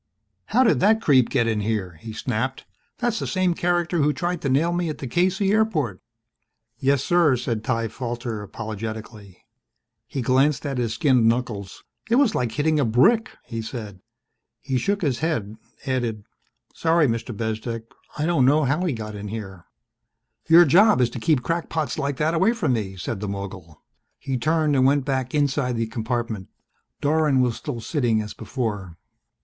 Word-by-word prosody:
"How 250 +4 +3
did 235 - +3
that 215 +3 +4
creep 135 - +4
get 125 -4 +1
in 110 -2 0
here?" 100 -5 -2
he 115 - -7
snapped. 125 +3 -3 0.3
"That's 235 -2 -1
the - - -3
same 185 -2 +1
character 175 0 0
who 150 0 +3
tried 175 0 -2
to 140 - -1
nail 155 +6 +2
me 175 -1 -1
at 155 - -4
the - - -6
K.C. 185 - +1
airport." 165 - +1 0.8
"Yes, 140 0 +2
sir," 170 -6 +4
said 115 -2 -3
Ty 115 -1 -1
Falter 120 -2 -4
apologetically. 110 -1 -7 0.6
He 130 0 -4
glanced 130 +3 +2
at 135 -3 -2
his 115 -2 -1
skinned 125 -5 +3
knuckles. 115 -5 -2 0.3
"It 230 - +3
was 255 -5 +4
like 120 -3 -1
hitting 155 +4 +1
a - - +3
brick," 175 - +3 0.2
he 115 -2 -5
said. 110 -4 -7 0.6
He 130 -2 -1
shook 200 +9 -1
his 135 -6 0
head, 115 -11 -2 0.3
added, 120 -5 -2 0.5
"Sorry, 165 -1 +2
Mr. 115 +1 -2
Bezdek. 110 +1 -3 0.3
I 150 - 0
don't 165 -6 +2
know 145 +4 +4
how 145 +7 +1
he 165 - 0
got 110 -2 -6
in 105 0 -6
here." 95 -5 -7 0.8
"Your 170 +2 +8
job 205 +3 +5
is 120 -2 +2
to 120 - -6
keep 150 -1 +1
crackpots 165 -2 -2
like 140 -1 -2
that 155 +2 +1
away 195 +8 +3
from 170 - 0
me," 100 -5 -3
said 95 +3 -4
the 105 - -4
mogul. 95 -5 -7 0.3
He 135 - -4
turned 155 +3 +1
and 130 - +4
went 135 0 +3
back 130 -1 -2
inside 140 -3 +1
the 115 0 0
compartment. 115 -3 -3 0.5
Dorwin 150 -2 +2
was 125 -2 +1
still 140 -6 -5
sitting 120 -4 0
as 105 -1 -5
before. 105 -9 -4
130 Hz, 175 wpm, -23 LUFS, 110-160 Hz, 0.8 s, Your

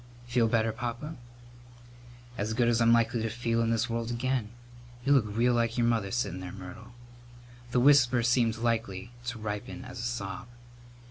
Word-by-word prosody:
"Feel 120 -1 +2
better, 115 0 +2
Papa?" 120 +8 -5 1.2
"As 110 0 -2
good 120 0 +3
as 120 0 +2
I'm 115 0 +5
likely 115 0 +3
to 115 - -1
feel 115 0 0
in 115 - +1
this 115 +1 +1
world 115 -1 -2
again. 120 -2 -1 0.6
You 140 - +5
look 125 -6 +4
real 115 +4 +2
like 115 0 +1
your 120 - +3
mother 115 -4 +1
settin' 120 -5 -2
there, 90 -1 -6
Myrtle." 110 +6 -10 0.8
The 125 0 +2
whisper 130 -3 +5
seemed 120 -1 +2
likely 115 -3 -2 0.2
to 125 -1 -3
ripen 110 +4 -5
as 125 0 -8
a - - -3
sob. 120 -1 -4
115 Hz, 175 wpm, -29 LUFS, 110-120 Hz, 1.2 s, I'm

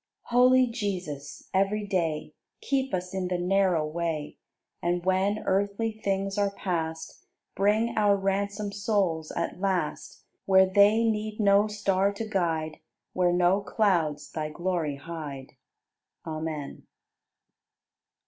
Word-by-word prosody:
75. - - -16
Holy 255 +1 +6
Jesus, 180 - -5
every 195 +2 +1
day 165 -6 -1 0.3
Keep 270 -1 0
us 180 0 -3
in 190 -1 -2
the 180 0 -1
narrow 180 -3 +2
way, 155 -1 -3 0.4
And 175 +1 -1
when 190 +3 +1
earthly 200 +3 0
things 195 -2 -2
are 200 -1 +2
past, 165 -5 -4 0.3
Bring 215 +4 +2
our 205 -2 +4
ransomed 200 +1 -2
souls 195 -7 0
at 170 +1 -3
last 190 -2 -2 0.2
Where 190 -1 +6
they 205 +4 +4
need 215 -1 -1
no 200 0 +4
star 200 -2 +1
to 220 +2 -5
guide. 165 -6 -1 0.3
Where 180 -1 +2
no 180 +3 +3
clouds 180 -8 0
Thy 155 -1 -3
glory 170 -2 -2
hide. 140 -3 -8 0.7
Amen. 155 -2 -5
190 Hz, 120 wpm, -27 LUFS, 170-205 Hz, 0.7 s, Holy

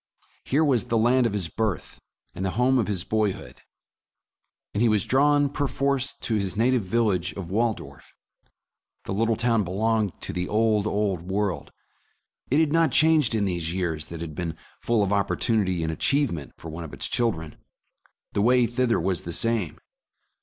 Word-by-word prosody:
Here 150 +4 +2
was 125 -8 +2
the 115 - 0
land 120 +2 +3
of 110 - -4
his 100 -5 -1
birth, 105 +1 -3 0.3
and 95 - -5
the 95 - 0
home 130 +1 +3
of 115 - 0
his 95 -5 -2
boyhood, 105 -2 -2 1.1
and 105 - -1
he 120 - +4
was 105 -3 +2
drawn, 145 +2 +3
perforce, 140 -1 -1
to 115 - -2
his 100 -2 -1
na 120 +3 +3
tive 125 -2 +2
village 95 -3 0
of 95 -3 -7
Waldorf. 115 +2 -2 0.9
The - - -3
little 115 +3 +1
town 115 -1 +1
belonged 105 +1 -1
to - - -3
the 90 0 -2
old, 110 -1 +2
old 100 -4 -1
world. 95 +1 -2 0.8
It 140 - +3
had 160 -2 +2
not 165 -3 +3
changed 155 -4 +4
in 105 -2 +1
these 85 -3 -2
years 80 -5 -2
that 85 -1 -8
had 80 -2 -6
been 80 0 -4 0.2
full 115 -3 +1
of 100 - -1
oppor 100 -1 +1
tunity 95 -7 0
and 80 - -1
achievement 85 - 0
for 80 - -9
one 85 +2 -6
of 80 - -8
its - - -4
children. 80 -10 -1 0.8
The 100 - +1
way 125 +2 +4
thither 120 +1 +1
was 90 +1 0
the 85 - -6
same. 110 -2 +1
105 Hz, 180 wpm, -25 LUFS, 90-120 Hz, 1.1 s, he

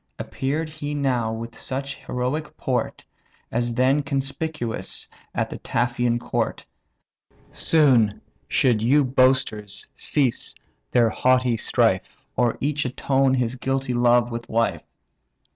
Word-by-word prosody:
Appear'd 150 +4 -2
he 150 -1 -5
now 125 -6 0
with 115 +1 -6
such 135 +1 -4
heroic 130 +5 -3
port, 125 -3 -2 0.5
As 120 0 -1
then 130 +4 +3
conspicuous 140 -2 -3 0.3
at - - -1
the - - -6
Taphian 120 0 0
court; - - -2 0.9
Soon 125 -10 +3 0.3
should 120 -5 +2
yon 140 +6 +4
boasters 130 -6 +2
cease 135 -6 +1 0.4
their 115 -2 +4
haughty 125 0 +2
strife, 110 - 0
Or 120 -2 +1
each 145 +1 0
atone 135 +1 +1
his 125 -2 0
guilty 135 0 -2
love 120 0 +3
with 115 0 -6
life. 110 -8 +1
125 Hz, 115 wpm, -23 LUFS, 120-135 Hz, 0.9 s, yon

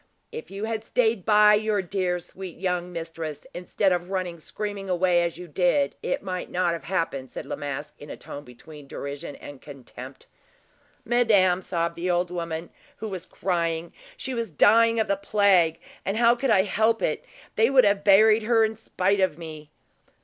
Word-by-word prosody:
"If 465 0 -8
you 200 +2 -6
had 220 0 -2
stayed 225 -4 +1
by 210 -1 +6
your 210 -1 +1
dear, 180 -1 -1
sweet 180 0 -9
young 180 -1 -2
mistress, 165 -3 -6
instead 180 +2 0
of 175 0 -1
running 185 -3 -3
screaming 200 +3 -6
away 180 -1 +3
as 170 -1 -2
you 180 0 -9
did, 180 - +1
it - - -2
might 185 -2 -4
not 175 -1 0
have 170 - -6
happened," 165 -8 -2
said - - -7
La - - -4
Masque, 145 +1 -5
in 145 - -11
a - - -7
tone 145 - -9
between 145 +3 -13
derision 140 +2 -6
and 145 -2 -11
contempt. 130 -2 -11 0.8
"Madame," 205 -7 +3
sobbed 170 -2 -2
the 175 +2 -3
old 175 0 +1
woman, 170 -1 -4 0.3
who 220 - -5
was 185 -2 -7
crying, 170 -2 -2 0.2
"she 265 - -4
was 230 -2 -3
dying 230 +8 +4
of 220 - +1
the 200 - +2
plague, 195 -5 +3 0.2
and 195 +3 -2
how 235 0 +5
could 255 +2 -2
I 190 -4 +5
help 220 +3 +1
it? - - -1 0.3
They 225 +2 +4
would 265 -2 +6
have 200 -1 +2
buried 215 +2 +6
her 225 0 +3
in 220 0 -3
spite 200 -2 0
of 185 -5 +1
me." 155 -3 -9
185 Hz, 185 wpm, -25 LUFS, 165-210 Hz, 0.8 s, by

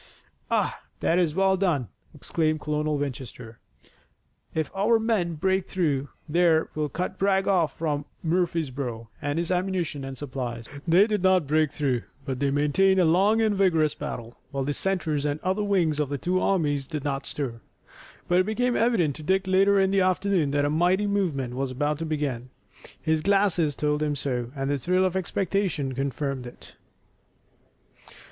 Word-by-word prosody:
"Ah, - - 0 0.2
that 170 - +2
is 165 -4 +1
well 190 0 +3
done!" 170 - 0 0.3
exclaimed 155 +1 -1
Colonel 150 0 -1
Winchester. 125 -4 -6 1.0
"If 160 -1 -1
our 215 +4 +3
men 215 -7 0
break 190 +4 0
through 145 -7 0 0.2
there 165 0 +3
we'll 150 -1 -2
cut 180 +6 -4
Bragg 195 0 +2
off 170 -7 +2
from 150 -3 -1 0.2
Murfreesborough 140 - -1
and 145 +2 -2
his 170 +1 -1
ammunition 180 -6 -1
and 135 0 -6
supplies." 125 -4 -5 0.2
They 175 +5 +6
did 210 -3 -1
not 185 -3 +4
break 155 0 +2
through, 130 -5 0 0.2
but 130 -3 -3
they 140 0 +1
maintained 150 +7 +3
a 180 - +5
long 195 +7 +4
and 215 -1 +2
vigorous 165 -6 +2
battle, 120 0 -7
while 135 -1 -2
the 145 +2 -1
centers 160 -5 -1
and 145 0 -1
other 190 +3 0
wings 175 -7 +1
of 150 -3 0
the 145 - -2
two 180 +6 0
armies 145 -8 +1
did 150 -3 -4
not 140 -1 -2
stir. 120 -6 -4 0.7
But 175 +1 +3
it 185 - +3
became 245 +3 0
evident 205 - +2
to - - -9
Dick 190 +4 +1
later 195 +1 +4
in 190 0 +3
the 195 -1 +3
afternoon 185 -3 +1
that 145 0 +1
a 145 - 0
mighty 180 +6 +2
movement 170 -12 -1
was 135 +1 -2
about 145 +3 -1
to 165 - -3
begin. 140 -5 -2 0.5
His 160 0 0
glasses 185 -6 +2
told 150 0 0
him 150 -1 0
so, 125 -3 -2
and 135 0 -2
the 145 - 0
thrill 185 +7 +2
of 185 0 -1
expectation 190 -6 -1
confirmed 135 0 -3
it. 120 - -13
155 Hz, 170 wpm, -26 LUFS, 140-190 Hz, 1.0 s, They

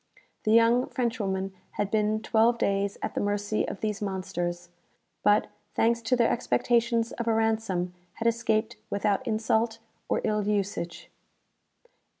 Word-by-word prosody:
The 215 - +3
young 230 +2 +5
Frenchwoman 195 -6 -1 0.2
had 205 -1 -2
been 215 0 +1
twelve 230 +1 +3
days 200 -2 0
at - - -2
the - - -1
mercy 205 +1 0
of - - -6
these 215 -1 -2
monsters; 175 -3 -3 0.5
but, 205 +1 +3 0.3
thanks 235 +1 +2
to 230 +2 +2
their 235 -2 +3
expectations 235 - +1
of 235 - -4
a 225 - +3
ransom, 220 -5 0 0.2
had 230 - -2
escaped 225 -1 +1
without 200 +3 0
insult 225 0 +1 0.3
or - - +1
ill 210 0 +1
usage." 200 -4 -2
215 Hz, 140 wpm, -28 LUFS, 200-230 Hz, 0.5 s, young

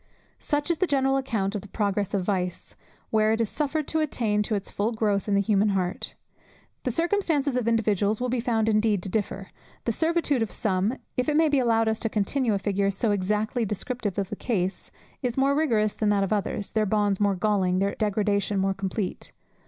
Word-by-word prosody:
Such 295 +2 0
is 335 - -1
the 370 - +2
general 270 -2 +2
account 220 -7 -1
of 205 - -3
the 205 - -12
progress 200 -1 -1
of 195 - 0
vice, 180 -3 -2 0.4
where 215 0 +3
it 225 - -1
is 225 - 0
suffered 300 0 -2
to 320 - 0
attain 230 -9 0
to 215 +1 -1
its 200 - -4
full 210 +3 0
growth 210 -3 0
in 205 - +2
the 200 - +4
human 210 0 +3
heart. 180 -1 -3 0.7
The - - +1
circumstances 320 - +1
of 250 -2 0
individuals 215 -2 +1
will 250 - -1
be 250 0 0
found 230 -2 +1
indeed 215 -3 +2
to - - -4
differ; 195 -1 -3 0.3
the 235 - +1
servitude 320 -1 +1
of 225 - -1
some, 200 +4 0 0.2
if 250 +3 +1
it 300 - +2
may 320 -1 +4
be 285 -2 +3
allowed 225 -2 +2
us 220 0 0
to 225 - 0
continue 220 +2 0
a - - +1
figure 195 0 0
so 200 +3 0
exactly 210 +4 0
descriptive 210 0 -3
of 195 -2 -1
the - - -2
case, 190 -5 -2 0.3
is 250 -2 -2
more 275 +1 +3
rigorous 225 -9 +2
than 215 - 0
that 200 -1 +3
of 195 - 0
others, 205 -1 -2
their 215 -1 +1
bonds 205 -1 +1
more 200 -1 +2
galling, 185 -2 +1
their 195 +1 +1
degradation 205 -1 0
more 195 0 +1
complete. 195 0 -4
215 Hz, 210 wpm, -26 LUFS, 200-250 Hz, 0.7 s, the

